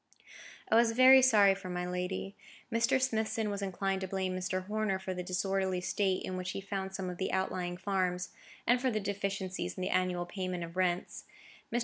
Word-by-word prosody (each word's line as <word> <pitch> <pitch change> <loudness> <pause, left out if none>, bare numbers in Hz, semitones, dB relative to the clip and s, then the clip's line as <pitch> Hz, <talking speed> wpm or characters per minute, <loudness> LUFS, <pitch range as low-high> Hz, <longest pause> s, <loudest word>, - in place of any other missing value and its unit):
I - - +5
was 230 0 +5
very 260 +2 +8
sorry 210 -6 +6
for 195 -1 -8
my 180 0 -2
lady. 180 +2 -3 0.4
Mr. 230 +3 +3
Smithson 220 -3 0
was 200 0 -3
inclined 195 0 -1
to 190 - -3
blame 185 -1 -2
Mr. 185 0 -2
Horner 210 -1 0
for 190 0 -4
the 180 - -4
disorderly 190 +1 -1
state 190 +1 0
in 185 - -4
which 185 0 -4
he - - -3
found 195 -1 -4
some 190 -1 -3
of 180 -1 -6
the 190 - -1
outlying 180 -2 -1
farms, 185 -2 -1 0.4
and 245 +1 +3
for 260 - +2
the 215 -3 0
deficiencies 195 - -3
in - - -4
the 185 - -1
annual 180 -1 0
payment 185 -1 -4
of 170 +1 -8
rents. 180 -1 -1 0.5
Mr. 240 - +1
190 Hz, 200 wpm, -32 LUFS, 185-205 Hz, 0.5 s, very